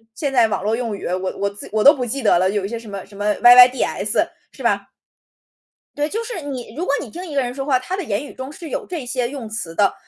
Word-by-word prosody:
现 275 +2 -2
代 240 -3 +5
网 210 - -2
络 215 +2 +1
用 230 -4 -3
语， - - -8
我 185 +1 -2
我 200 - 0
自 200 - -10
我 215 0 +1
都 285 - +9
不 260 - -3
记 245 +2 -3
得 190 - +4
了， 185 +1 +2
有 200 -1 -1
一 - - -2
些 230 +1 -5
什 230 - -13
么 200 -2 -7
什 200 - -17
么 205 +1 0
“yyds”， 245 +1 +5 0.2
是 - - -11
吧？ - - +1 1.1
对， 295 +1 0
就 445 +6 -2
是 455 -9 -5
你 255 -5 -7
如 345 +4 -3
果 280 - 0
你 - - -8
听 355 +3 -7
一 320 - -8
个 275 - +2
人 245 -1 -3
说 270 - -4
话， 265 -3 +2
他 355 +9 -4
的 385 - -4
言 220 -1 -2
语 - - -12
中 260 +2 -7
是 325 +1 -9
有 - - -3
这 330 -8 -5
些 245 -1 -1
用 265 -5 -6
词 180 -7 -5
的， 200 +2 +3
245 Hz, 315 characters per minute, -20 LUFS, 210-285 Hz, 1.1 s, 都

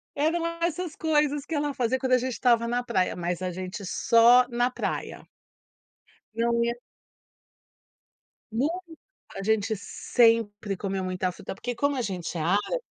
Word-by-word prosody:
eram 320 +4 +1 0.2
essas 340 0 -1
coisas 295 -2 +1
que 325 - -4
ela 290 -1 -1
fazia 255 -1 0
quando 260 0 0
a - - +7
gente 255 +1 -2
estava 235 -1 +2
na 245 +1 0
praia, 190 -7 0
mas 175 0 -3
a 185 - -1
gente 185 +3 -6
só 235 +6 +5
na 240 0 +1
praia. 255 - -4 1.1
Não 235 +1 +1
ia 235 0 0 1.8
Nun 250 +7 +1 0.7
a 195 - -4
gente 220 0 +2 0.4
sempre 225 -4 +3
comeu 190 0 -3
muita 185 0 -1
fruta. 180 - -8
Porque 245 +5 -4
como 285 +4 +1
a - - 0
gente 185 -6 -4
é - - -2
árabe 200 - +1
235 Hz, 155 wpm, -26 LUFS, 195-260 Hz, 1.8 s, a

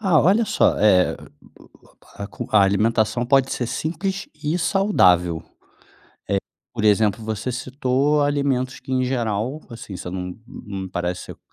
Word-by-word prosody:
Ah 185 -8 +4
olha 200 +8 +4
só, - - +2
eh, 95 -4 +4 1.0
a 100 - -5
comi - - -8
a 105 -2 +6
alimentação 110 +4 +2
pode 135 +1 +3
ser 120 - -2
simples 190 - -3
e 155 +4 0
saudável, 90 - +3
eh, - - -32 1.2
por 115 - -3
exemplo, 105 +1 +3
você 110 +3 -3
citou 130 +3 0
alimentos 140 -3 0
que - - -9
em 130 0 +1
geral 125 +2 -2
assim, 115 -5 -9
você 90 - -6
não 90 0 -5
não 100 -7 -7
parece 90 0 -4
que - - -25
120 Hz, 145 wpm, -22 LUFS, 100-145 Hz, 1.2 s, a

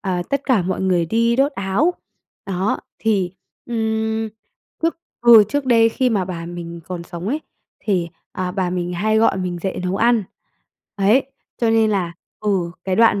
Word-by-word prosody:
ờ, 185 -3 -1
tất 280 0 0
cả 240 -9 +3
mọi 185 +2 -2
người 180 -3 +2
đi 230 +5 +2
đốt 275 +2 +3
áo. 220 - +1 0.5
Đó, 190 +1 -1 0.2
thì, 195 -5 +1 0.3
ừm, 220 -1 -1 0.5
lúc 330 - +2 0.3
vừa 225 -3 +10
trước 285 +6 -2
đây 230 -2 +5
khi 250 +2 +1
mà 195 -4 +1
bà 170 -2 -5
mình 170 -1 -7
còn 180 -2 -5
sống 175 +3 -6
ấy, 300 +5 -1 0.4
thì, 180 -5 0 0.2
à, 185 -1 -2
bà 185 -2 -1
mình 180 -1 -2
hay 215 +5 +1
gọi 225 - +3
mình 180 -2 -3
dậy 190 - -2
nấu 185 +2 0
ăn, 230 -2 +3 0.7
ấy, 210 +7 +4 0.3
cho 230 -2 +2
nên 225 -1 +4
là 180 -4 0 0.3
ừ, 190 -5 0
cái 190 -1 0
đoạn 225 -3 +5
200 Hz, 175 wpm, -20 LUFS, 180-225 Hz, 0.7 s, vừa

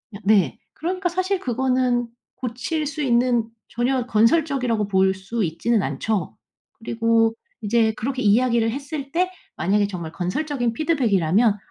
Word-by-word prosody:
으 - - -5
네. 195 - +3
그러니까 360 +2 -2
사실 370 +2 -1
그거는 250 -1 0 0.3
고칠 260 +6 -3
수 300 +1 -4
있는 240 -3 +2 0.2
전혀 250 +1 0
건설적이라고 245 -2 +2
볼 190 -1 +3
수 195 +4 -3
있지는 195 +7 0
않죠. 210 -7 -2 0.4
그리고 230 0 +1 0.3
이제 220 +1 +2
그렇게 260 +2 -2
이야기를 230 +1 +3
했을 280 +1 -6
때 365 +2 +1 0.3
만약에 205 +2 +2
정말 170 -5 -6
건설적인 240 - -2
피드백이라면 220 - +2
235 Hz, 315 characters per minute, -22 LUFS, 210-270 Hz, 0.4 s, 네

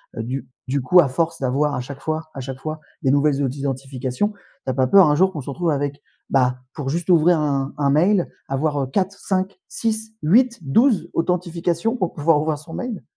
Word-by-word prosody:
h - - -6
eu, - - -4
du 130 +1 -4 0.2
du 135 +1 0
coup, 180 +8 +5
à 145 - +1
force 165 +4 -1
d'avoir 140 +3 +1
à - - -2
chaque 135 +2 -8
fois 155 0 -3
à 135 - -6
chaque 130 0 -6
fois 155 +1 -5 0.2
des 135 - +2
nouvelles 145 0 +2
outils 135 +1 -2
d'identifications, 135 - -2 0.3
tu - - -3
as - - -3
pas 130 0 +2
peur 195 +2 +7
un 150 - +3
jour 190 +4 +3
qu'on 155 - -6
se 135 - -8
retrouve 170 +4 -1
avec, 145 0 -2 0.3
bah, 125 -1 +2
pour 140 -4 -4
juste 170 +4 -2
ouvrir 170 0 +5
un 140 -2 -1
un 140 -1 +1
mail 175 +6 +3 0.2
avoir 145 +1 0
heu, - - -3
4-5-6-8-12 205 - 0
authentifications 175 +5 -1
pour 185 -5 -1
pouvoir 150 0 +3
ouvrir 155 -1 -1
son 160 +2 -11
mail? 245 -6 -5
155 Hz, 200 wpm, -21 LUFS, 135-180 Hz, 0.3 s, peur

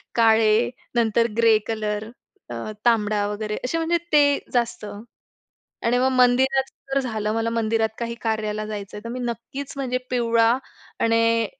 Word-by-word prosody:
काळे 225 -1 +4 0.3
नंतर 230 0 +3
grey 230 -2 +5
colour 215 -1 -3 0.4
त - - -3 0.3
तांबडा 210 -3 +2
वगैरे 210 +1 -3
असे 290 +6 -1
म्हणजे 330 +1 +1 0.2
ते 285 -1 +5
जास्त. 235 -3 0 1.0
आणि 240 +1 +3
मग 260 +1 +3
मंदिरात 265 +2 +3 0.2
तर 275 - +3
झालं. 215 -4 -2
मला 225 +1 -1
मंदिरात 225 -1 +1
काही 235 0 -3
कार्याला 215 -1 -2
जायचं 205 -2 -6
आहे 210 - -9
तर - - -5
मी 250 - -4
नक्कीचं 245 +4 -5
म्हणजे 255 -1 -1
पिवळा 230 -2 +3 0.5
आणि 230 0 +3
230 Hz, 145 wpm, -23 LUFS, 215-245 Hz, 1.0 s, grey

